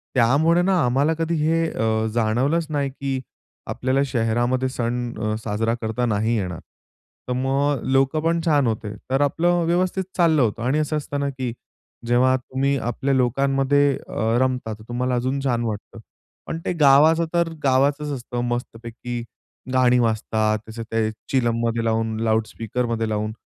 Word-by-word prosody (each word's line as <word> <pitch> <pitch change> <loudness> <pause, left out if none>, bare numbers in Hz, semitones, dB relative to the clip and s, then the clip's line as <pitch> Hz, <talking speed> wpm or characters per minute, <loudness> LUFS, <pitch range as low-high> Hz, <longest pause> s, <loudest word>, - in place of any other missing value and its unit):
त्यामुळे 145 +8 +4
ना 190 +2 +2
आम्हाला 135 +6 +2
कधी 165 +1 -1
हे 165 +2 +2
अ, 110 0 0
जाणवलंच 125 +9 +1
नाही, 145 -2 -1
की 135 -1 -3 0.5
आपल्याला 130 +1 0
शहरामध्ये 120 +1 0
सण 120 -1 -2
अ, 110 -1 -1
साजरा 115 +2 0
करता 110 +2 -1
नाही 110 +1 +1
येणार. 90 -5 -3 0.7
तर 125 - -1
मग 135 +3 +1
अ, - - -8
लोकं 135 +3 +2
पण 165 +1 +1
छान 145 -5 +3
होते. 110 -2 -3 0.2
तर 135 +2 +2
आपलं 170 +4 +2
व्यवस्थित 180 +3 +1
चाललं 165 -4 +4
होतं 115 -1 0
आणि 135 +5 +1
असं 155 0 0
असतं 145 -1 -4
ना, 140 0 0
की 130 -3 -4 0.5
जेव्हा 125 +2 +4
तुम्ही 135 +2 -1
आपल्या 135 +3 -1
लोकांमध्ये 135 +2 +2
अ, 115 +2 0
रमता, 125 -4 -1
तर 110 +1 -12
तुम्हाला 125 +1 -1
अजून 130 +3 -1
छान 120 -3 0
वाटतं. 110 0 -5 0.5
पण 165 - -4
ते - - 0
गावाचं 155 +2 +5
तर 170 -1 +2
गावाचंच 140 +2 +2
असतं. 120 -2 -4
मस्तपैकी 120 0 -5 0.5
गाणी 125 -1 +4
वाजतात. 110 -1 +1
तसं 115 +1 -6
ते 110 -1 +1 0.2
चिलममध्ये 115 -2 +1
लावून 110 -1 0
लाउडस्पीकरमध्ये 115 +1 -1
लावून 110 0 -1
125 Hz, 155 wpm, -22 LUFS, 115-140 Hz, 0.7 s, गावाचं